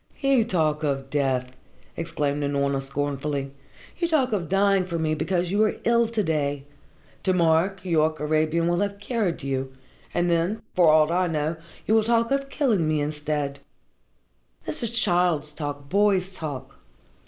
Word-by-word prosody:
"You 275 -4 +3
talk 160 -8 0
of 135 -3 -2
death!" 130 -3 0 0.4
exclaimed 145 -3 -2
Unorna 140 -1 0
scornfully. 140 0 -3 0.5
"You 340 - +1
talk 275 -7 +2
of 180 -6 -2
dying 195 0 +3
for 170 -2 -2
me 160 -1 0
because 175 +2 -1
you 205 +2 +2
are 215 - +1
ill 235 0 +3
to 225 -2 -1
day. 145 -4 -1 0.6
To 190 - +1
morrow, 165 0 +3
Keyork 160 -5 0
Arabian 155 +2 +1
will 175 0 +1
have 200 0 -1
cured 205 - -2
you, 135 -1 -3 0.4
and 175 - 0
then, 170 +5 0
for 175 -3 +5
aught 155 +1 +4
I 180 +1 +2
know, 155 0 -1 0.3
you 220 - +1
will 220 -1 +5
talk 230 +1 +2
of 275 0 0
killing 230 - +1
me 155 -1 +1
instead. 150 -1 -2 1.1
This - - -2
is 235 - 0
child's 175 -9 +1
talk, 145 -2 -5
boy's 195 +1 +2
talk. 140 -6 -7
165 Hz, 160 wpm, -25 LUFS, 145-200 Hz, 1.1 s, for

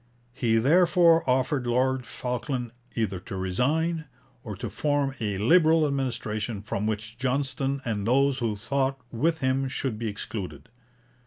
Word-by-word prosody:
He 120 -3 +1
therefore 165 +6 +5
offered 130 0 +1
Lord 130 +1 +1
Falkland 125 -1 -3 0.2
either 100 -5 -1
to 95 - -8
resign, 150 - 0 0.4
or 105 -5 -6
to - - -5
form 145 -2 0
a 105 -3 -2
Liberal 160 - +5
administration 115 -6 -2
from 105 0 -2
which 110 +2 -4
Johnston 135 +1 -1
and 105 -3 -2
those 135 +2 +3
who 115 -4 -1
thought 135 +5 -1
with 160 +7 0
him 130 +1 +1
should 130 -4 -3
be 115 - -2
excluded. 105 +1 -6
130 Hz, 140 wpm, -26 LUFS, 110-140 Hz, 0.4 s, therefore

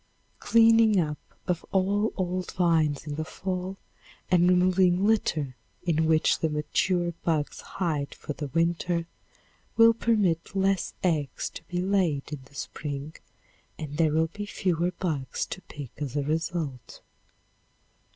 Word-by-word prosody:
Cleaning 225 -2 +5
up 150 -3 -1 0.3
of 175 -2 -1
all 200 +3 +2
old 185 -1 -2
vines 160 -5 +2
in 145 -1 -5
the 155 - -1
fall 185 +3 -4 0.5
and 180 0 +5
removing 180 +1 +4
litter 155 - +1 0.3
in 160 -2 +1
which 160 -1 +3
the 160 - +1
mature 170 +4 0
bugs 155 -3 -1
hide 150 -6 -3
for 150 - -6
the 145 0 -5
winter 170 +3 0 0.7
will 230 0 +8
permit 205 -7 +1
less 195 0 +1
eggs 155 -7 0
to - - -9
be 180 0 -2
laid 180 -7 0
in 145 - -4
the 140 - -20
spring 145 +1 -5 0.6
and 150 -2 -6
there 160 -2 +3
will 160 +1 +2
be 205 0 -5
fewer 175 -3 0
bugs 155 -8 -2
to 185 - -7
pick 145 -7 -9
as 145 -3 -4
a 145 - +1
result. 155 -4 -3
170 Hz, 140 wpm, -27 LUFS, 150-185 Hz, 0.7 s, will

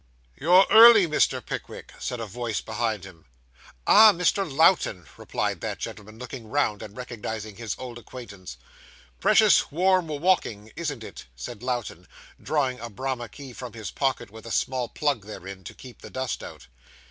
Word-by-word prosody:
'You're 180 +5 +5
early, 225 -3 +9
Mr. 155 -2 +1
Pickwick,' - - -7
said 125 - -4
a 115 - -4
voice 115 0 -3
behind 110 -4 -2
him. 85 -4 -14 0.6
'Ah, 215 0 +8
Mr. 180 -1 0
Lowten,' 140 - +3
replied - - -3
that - - -3
gentleman, 110 +1 -8
looking 125 -1 -8
round, 120 -6 0
and 105 +1 -10
recognising 110 -4 -6
his 115 -2 -4
old 125 -2 -8
acquaintance. 100 - -10 0.6
'Precious - - +4
warm 185 +2 +2
walking, 145 - 0
isn't 150 -7 -4
it?' - - -10
said 105 - -8
Lowten, 120 -8 -4 0.3
drawing 135 -5 0
a 120 - -6
Bramah 120 +1 -4
key 135 -3 -11
from 125 -2 -8
his 110 -2 -7
pocket, 130 -5 -1
with 110 +1 -12
a - - -7
small 125 0 -1
plug 140 -9 -1
therein, 95 -2 -9
to - - -9
keep 125 -3 -13
the - - -10
dust 130 -3 -3
out. - - -10
120 Hz, 160 wpm, -25 LUFS, 110-145 Hz, 0.6 s, early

